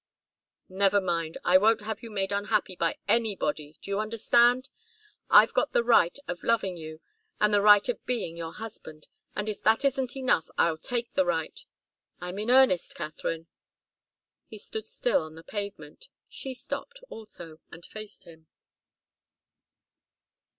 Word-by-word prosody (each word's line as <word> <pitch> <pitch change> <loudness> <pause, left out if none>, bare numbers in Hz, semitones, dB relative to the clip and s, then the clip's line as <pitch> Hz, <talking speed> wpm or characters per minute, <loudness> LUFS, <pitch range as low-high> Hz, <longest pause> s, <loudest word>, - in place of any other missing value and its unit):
"Never 195 +1 +2
mind. 170 -4 -2
I 185 +1 +6
won't 220 +2 +3
have 220 +1 -5
you 230 - -9
made 195 -2 -2
unhappy 205 -1 0
by 170 -1 -1
anybody, 195 -9 0
do 200 - -7
you 200 - 0
understand? 235 +4 +3 0.6
I've - - +7
got - - 0
the 235 - +3
right 230 -6 +4
of 175 -1 -5
loving 200 -6 0
you, 155 -1 -9 0.4
and 210 0 +3
the 205 - +4
right 205 +1 +6
of 245 - -3
being 225 -9 -2
your 165 -1 -6
husband, 185 -8 -10 0.3
and 210 - -2
if 215 - -4
that 225 +5 +3
isn't 265 -2 0
enough 255 -11 +1
I'll 165 -1 +2
take 240 +1 -2
the 185 - +3
right. 175 - -2 0.6
I'm 180 +2 -6
in 215 +3 -3
earnest, 255 -9 +4
Katharine." 160 +2 -5 1.0
He 215 - -10
stood 220 +1 -6
still 245 - 0
on 155 0 -9
the 165 - -12
pavement; 205 - -7 0.2
she 265 -1 -7
stopped, - - -6
also, 175 -8 -11
and 170 - -12
faced 215 -1 -11
him. 160 -1 -16
205 Hz, 150 wpm, -27 LUFS, 170-230 Hz, 1.0 s, I've